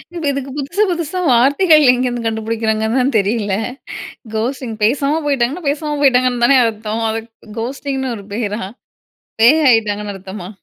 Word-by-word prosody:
இப்ப 340 Hz, -, -4 dB
இதுக்கு 275 Hz, -1 st, -4 dB
புதுசு 320 Hz, +9 st, 0 dB
புதுசா 340 Hz, +1 st, -3 dB
வார்த்தைகள் 295 Hz, +6 st, +5 dB
எங்கேருந்து 245 Hz, -1 st, -1 dB
கண்டுபிடிக்கிறாங்கன்னு 220 Hz, +1 st, -1 dB
தான் 270 Hz, +3 st, 0 dB
தெரியல. 205 Hz, -1 st, 0 dB, 0.8 s
கோஸ்ட்டிங் 240 Hz, +1 st, -3 dB
பேசாம 280 Hz, +7 st, +2 dB
போய்ட்டாங்கன்னா, 280 Hz, +4 st, 0 dB
பேசாம 295 Hz, +1 st, -2 dB
போய்ட்டாங்கன்னு 250 Hz, -3 st, +3 dB
தானே 270 Hz, +2 st, +5 dB
அர்த்தம். 220 Hz, 0 st, -3 dB
அது 225 Hz, +1 st, -2 dB, 0.4 s
கோஸ்டிங்ன்னு 265 Hz, +1 st, -3 dB
ஒரு 200 Hz, -, -11 dB
பேரா? 210 Hz, -1 st, -3 dB, 0.8 s
பேய் 305 Hz, +7 st, +6 dB
ஆயிட்டாங்கன்னு 210 Hz, -3 st, +1 dB
அர்த்தமா? 190 Hz, -1 st, -8 dB
245 Hz, 130 wpm, -17 LUFS, 220-280 Hz, 0.8 s, பேய்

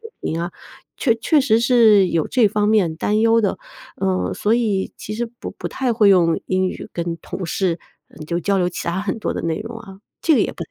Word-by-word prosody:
水 450 Hz, -1 st, -11 dB
平 165 Hz, -, -3 dB
啊， 175 Hz, +1 st, -4 dB, 0.4 s
确 235 Hz, -5 st, +2 dB
确 295 Hz, +7 st, +2 dB
实 230 Hz, -5 st, +3 dB
是 225 Hz, -5 st, +5 dB
有 165 Hz, -3 st, 0 dB
这 240 Hz, -3 st, +3 dB
方 210 Hz, +1 st, 0 dB
面 200 Hz, -7 st, +2 dB
担 210 Hz, +5 st, 0 dB
忧 230 Hz, 0 st, +4 dB
的， 205 Hz, -3 st, -1 dB, 0.4 s
嗯， 190 Hz, -1 st, 0 dB
所 215 Hz, +2 st, +1 dB
以 215 Hz, -5 st, 0 dB
其 215 Hz, -, -7 dB
实 240 Hz, +2 st, -2 dB
不 235 Hz, +1 st, -9 dB
不 -, -, -7 dB
太 255 Hz, -3 st, -1 dB
会 215 Hz, -3 st, +4 dB
用 170 Hz, -4 st, +4 dB
英 185 Hz, 0 st, +1 dB
语 -, -, -7 dB
跟 170 Hz, -1 st, -3 dB
同 185 Hz, -, -6 dB
事， 175 Hz, 0 st, -1 dB, 0.3 s
嗯， 155 Hz, -, -11 dB
就 170 Hz, +2 st, -2 dB
交 195 Hz, +2 st, +1 dB
流 180 Hz, -, +1 dB
其 175 Hz, -, -6 dB
他 175 Hz, +3 st, -1 dB
很 205 Hz, +2 st, -3 dB
多 -, -, -1 dB
的 -, -, -4 dB
内 165 Hz, -1 st, -1 dB
容 230 Hz, +1 st, -7 dB
啊。 195 Hz, -4 st, -12 dB, 0.2 s
这 320 Hz, -, +4 dB
个 -, -, +3 dB
也 -, -, +1 dB
不 -, -, -7 dB
太 -, -, -30 dB
205 Hz, 260 characters per minute, -20 LUFS, 180-230 Hz, 0.4 s, 是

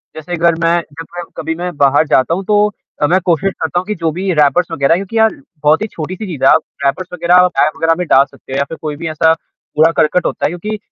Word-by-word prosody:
जैसे 155 Hz, +3 st, -7 dB
अगर 170 Hz, 0 st, +2 dB
मैं 165 Hz, +1 st, +3 dB
जब 165 Hz, +2 st, -9 dB
मैं 175 Hz, -, -3 dB
कभी 160 Hz, -, -3 dB
मैं 180 Hz, -1 st, -4 dB
बाहर 140 Hz, +2 st, +3 dB
जाता 130 Hz, +5 st, +2 dB
हूँ 190 Hz, +3 st, -2 dB
तो 210 Hz, 0 st, +3 dB, 0.3 s
अ, 145 Hz, -, +3 dB
मैं 185 Hz, +5 st, +3 dB
कोशिश 180 Hz, +3 st, +1 dB
करता 160 Hz, +2 st, 0 dB
हूँ 185 Hz, -, -6 dB
कि 210 Hz, -, -2 dB
जो 165 Hz, -3 st, -1 dB
भी 185 Hz, +4 st, -2 dB
रैपर्स 160 Hz, +3 st, +2 dB
वग़ैरह 140 Hz, -1 st, +2 dB
हैं, -, -, -1 dB
क्योंकि 225 Hz, -, -5 dB
यार 220 Hz, +5 st, +2 dB, 0.2 s
बहुत 150 Hz, +4 st, +4 dB
ही 215 Hz, -, -1 dB
छोटी-सी 185 Hz, +4 st, -6 dB
चीज़ 155 Hz, -7 st, -6 dB
है 135 Hz, -, +6 dB
आप -, -, +5 dB, 0.2 s
रैपर्स 175 Hz, +7 st, 0 dB
वग़ैरह 175 Hz, 0 st, +2 dB
आप 180 Hz, 0 st, +5 dB
टाय 150 Hz, -, +4 dB
वग़ैरह 165 Hz, 0 st, +2 dB
में 180 Hz, -, -2 dB
डाल 135 Hz, -1 st, +5 dB
सकते 135 Hz, -1 st, -13 dB
हो -, -, -1 dB
या 140 Hz, -, +2 dB
फिर 165 Hz, -, -7 dB
कोई 150 Hz, -2 st, -4 dB
भी 165 Hz, +3 st, -6 dB
ऐसा 160 Hz, +1 st, +3 dB, 0.4 s
कूड़ा-करकट 160 Hz, +2 st, +2 dB
होता -, -, -1 dB
है -, -, +2 dB
क्योंकि 210 Hz, +6 st, -5 dB
165 Hz, 265 wpm, -15 LUFS, 155-180 Hz, 0.4 s, है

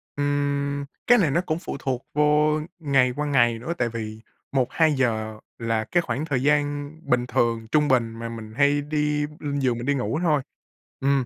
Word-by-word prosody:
Ừm, 145 Hz, 0 st, -1 dB, 0.2 s
cái 245 Hz, 0 st, +7 dB
này 165 Hz, -8 st, +3 dB
nó 170 Hz, -, +2 dB
cũng 165 Hz, -2 st, -2 dB
phụ 155 Hz, -, -5 dB
thuộc 130 Hz, -2 st, -3 dB
vô 150 Hz, +1 st, +3 dB, 0.2 s
ngày 135 Hz, -5 st, +3 dB
qua 150 Hz, -, -2 dB
ngày 120 Hz, -5 st, +3 dB
nữa, 160 Hz, +8 st, -3 dB
tại 120 Hz, -1 st, 0 dB
vì 110 Hz, -1 st, -6 dB, 0.3 s
1:00-2:00 125 Hz, -5 st, +1 dB, 0.2 s
là 115 Hz, -1 st, -1 dB
cái 175 Hz, +9 st, +1 dB
khoảng 150 Hz, -2 st, -3 dB
thời 135 Hz, -5 st, -1 dB
gian 145 Hz, 0 st, +1 dB
bình 125 Hz, 0 st, +1 dB
thường, 115 Hz, -2 st, 0 dB
trung 150 Hz, -1 st, +3 dB
bình 120 Hz, -4 st, +2 dB
mà 115 Hz, 0 st, -4 dB
mình 110 Hz, -1 st, -8 dB
hay 145 Hz, 0 st, +4 dB
đi 150 Hz, 0 st, 0 dB
lên 145 Hz, -1 st, -2 dB
giường 125 Hz, -3 st, +1 dB
mình 120 Hz, -, -5 dB
đi 145 Hz, -, +2 dB
ngủ 140 Hz, +4 st, -1 dB
thôi. 150 Hz, -4 st, +3 dB, 0.6 s
Ừm, 135 Hz, -1 st, +2 dB
140 Hz, 185 wpm, -24 LUFS, 120-150 Hz, 0.6 s, cái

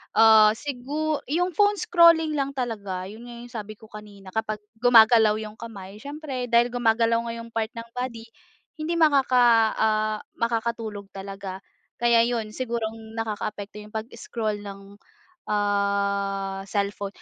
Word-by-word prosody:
Ah 220 Hz, -1 st, +7 dB
sigu 290 Hz, +4 st, -3 dB
yung 355 Hz, +6 st, 0 dB
phone 410 Hz, +4 st, +3 dB
scrolling 335 Hz, -4 st, +5 dB
lang 275 Hz, 0 st, -2 dB
talaga, 205 Hz, -7 st, -3 dB
yun 220 Hz, +5 st, -10 dB
nga 240 Hz, -, -9 dB
yung 245 Hz, -, -12 dB
sabi 215 Hz, -2 st, -7 dB
ko 220 Hz, +1 st, -18 dB
kanina 205 Hz, -3 st, -12 dB
kapag 215 Hz, -1 st, -3 dB, 0.2 s
gumagalaw 225 Hz, -2 st, +6 dB
yung 215 Hz, +1 st, -10 dB
kamay, 205 Hz, -3 st, -9 dB
siyempre 280 Hz, -1 st, -5 dB
dahil 235 Hz, 0 st, +3 dB
gumagalaw 230 Hz, -1 st, +2 dB
nga 230 Hz, -, -4 dB
yung 230 Hz, 0 st, -9 dB
part 220 Hz, -1 st, -1 dB
ng 230 Hz, 0 st, -8 dB
body, 245 Hz, -2 st, -5 dB, 0.6 s
hindi 330 Hz, +2 st, -2 dB
makaka 275 Hz, -6 st, +4 dB, 0.3 s
ah 215 Hz, 0 st, +1 dB, 0.2 s
makakatulog 225 Hz, -3 st, -2 dB
talaga. 195 Hz, -1 st, -7 dB, 0.4 s
Kaya 235 Hz, -1 st, +4 dB
yun, 225 Hz, -3 st, -2 dB
siguro 235 Hz, -3 st, -2 dB
ang 220 Hz, 0 st, -10 dB
nakakaapekto 210 Hz, -1 st, -4 dB
yung 210 Hz, -, -14 dB
pag-scroll 220 Hz, -1 st, -4 dB
ng 200 Hz, 0 st, -10 dB, 0.5 s
ah 200 Hz, -1 st, 0 dB
cellphone. 200 Hz, 0 st, -2 dB
225 Hz, 140 wpm, -25 LUFS, 205-245 Hz, 0.6 s, Ah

